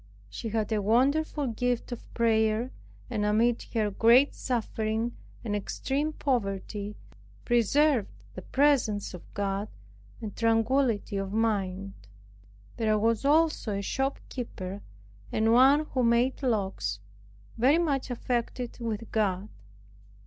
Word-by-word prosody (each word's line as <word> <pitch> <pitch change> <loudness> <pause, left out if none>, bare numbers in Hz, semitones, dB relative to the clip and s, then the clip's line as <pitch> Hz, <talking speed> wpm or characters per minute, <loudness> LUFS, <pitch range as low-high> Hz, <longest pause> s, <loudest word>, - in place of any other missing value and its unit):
She 225 - -5
had 220 0 -1
a 215 -1 +1
wonderful 280 +8 +2
gift 245 +1 -1
of 240 - -8
prayer, 220 +1 +2 0.4
and 220 -4 -2
amid 225 +3 +2
her 215 -2 +1
great 235 +7 +5
suffering 225 -1 -2 0.3
and 210 -3 -2
extreme 275 +8 -2
poverty, 205 -6 -2 0.5
preserved 240 +1 +3 0.2
the - - -7
presence 255 -9 +1
of 180 - -11
God, 200 +1 -1 0.5
and 215 -3 -6
tranquility 230 -1 +1
of 195 0 -3
mind. 200 -3 -1 0.8
There 215 -1 +2
was 225 +3 +1
also 300 -8 +2
a 200 - -3
shopkeeper, 235 -6 -4 0.5
and 225 +1 +2
one 275 +5 +6
who 260 - 0
made 240 +3 +2
locks, 195 - -1 0.6
very 270 +7 +5
much 285 -6 0
affected 245 0 -3
with 225 -1 -4
God. 205 -2 0
230 Hz, 115 wpm, -28 LUFS, 210-255 Hz, 0.8 s, one